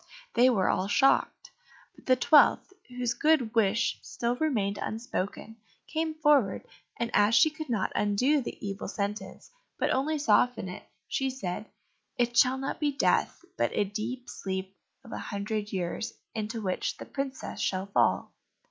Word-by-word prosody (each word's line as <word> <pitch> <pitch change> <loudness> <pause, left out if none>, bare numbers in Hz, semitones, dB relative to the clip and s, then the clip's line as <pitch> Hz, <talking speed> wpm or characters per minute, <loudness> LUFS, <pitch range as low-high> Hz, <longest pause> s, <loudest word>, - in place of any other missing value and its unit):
They 250 +2 +5
were 200 -7 +2
all 185 - +1
shocked; 270 +6 +2 0.4
but - - -19
the 255 - +6
twelfth, 295 +8 +4
whose 245 -2 -2
good 260 -3 +2
wish 225 +1 +2
still 240 +1 -2
remained 225 -9 0
unspoken, 225 -1 -4 0.3
came 315 0 -2
forward, 290 -10 +3 0.3
and 235 0 -2
as 210 +2 +4
she 315 - +6
could 310 -2 -7
not 220 -5 0
undo 250 +9 +2
the 235 - -6
evil 195 0 -5
sentence, 205 - -5 0.3
but - - +1
only 300 +4 +1
soften 235 -5 +2
it, 180 - -10 0.2
she 270 0 -1
said, 215 -6 -5 0.5
"It 240 0 +1
shall 250 +3 +5
not 270 +1 -4
be 295 -1 +1
death, 285 +5 +1
but - - +2
a - - +4
deep 225 +5 -5
sleep 190 0 -5 0.3
of 235 - -13
a - - -4
hundred 210 +1 -4
years, 190 +4 -3 0.2
into 220 0 -4
which 185 -2 -2
the - - -8
princess 275 -1 -5
shall 190 0 -1
fall." 200 - +1
235 Hz, 155 wpm, -28 LUFS, 205-265 Hz, 0.5 s, the